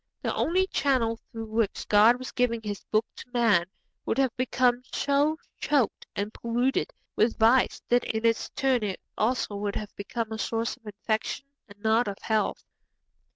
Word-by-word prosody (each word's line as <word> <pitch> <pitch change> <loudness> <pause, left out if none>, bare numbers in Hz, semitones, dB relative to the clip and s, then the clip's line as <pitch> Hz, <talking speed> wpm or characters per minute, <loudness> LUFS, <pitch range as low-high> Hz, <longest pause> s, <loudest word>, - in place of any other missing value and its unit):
The - - 0
one 370 +3 +2
channel 235 -5 +1
through 225 -1 -5
which 220 -2 -1
God 215 +3 +6
was 255 0 -7
giving 235 -2 0
His 205 -2 -5
Book 215 +1 +1
to - - -10
man 225 -8 +3 0.4
would - - -1
have 265 -3 +2
become 250 -1 +2
so 290 +2 +2 0.2
choked 285 -7 +1
and 205 +2 -3
polluted 245 - 0 0.2
with 225 +1 +2
vice 235 +3 +4
that 245 0 +3
in 220 +1 -2
its 230 -1 +2
turn 265 -3 +2
it 200 -3 -3 0.2
also 220 -2 0
would 205 0 -2
have 210 -1 -5
become 225 +2 -4
a 220 - -4
source 230 +1 -1
of 240 -4 -20
infection 220 +6 -2 0.2
and 205 - -14
not 225 +2 +3
of 200 -1 -4
health. 220 -1 0
230 Hz, 170 wpm, -27 LUFS, 215-255 Hz, 0.4 s, God